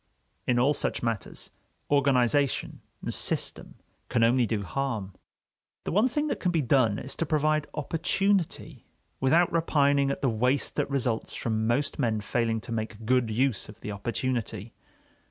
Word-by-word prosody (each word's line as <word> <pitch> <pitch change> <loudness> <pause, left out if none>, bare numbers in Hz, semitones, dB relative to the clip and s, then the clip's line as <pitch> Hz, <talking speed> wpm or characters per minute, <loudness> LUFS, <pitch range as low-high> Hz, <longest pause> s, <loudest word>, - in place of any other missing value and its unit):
In 125 - +3
all 135 +5 +4
such - - -1
matters, 115 -5 -2 0.4
organization 140 -1 +2 0.2
and - - -2
system - - -1 0.3
can 120 -2 +2
only 120 +1 +4
do 105 -2 -1
harm. 110 -5 -3 0.7
The - - -3
one 210 +8 +4
thing 295 +4 -1
that 305 - -2
can 180 - 0
be 165 -4 +1
done 120 -5 +3
is 135 - -5
to - - 0
provide 155 0 +1
opportunity, 180 +4 -1 0.3
without 165 +7 +3
repining 145 -4 +3
at 140 - -3
the - - +4
waste 125 +4 +1
that - - 0
results 125 -5 -1
from 110 -1 -1
most 135 +6 0
men 115 -5 +1
failing 115 +1 0
to - - -9
make 110 -1 -4
good 125 -1 +2
use 120 0 0
of 105 - -13
the 105 - -5
opportunity. 115 0 -3
130 Hz, 155 wpm, -27 LUFS, 115-145 Hz, 0.7 s, all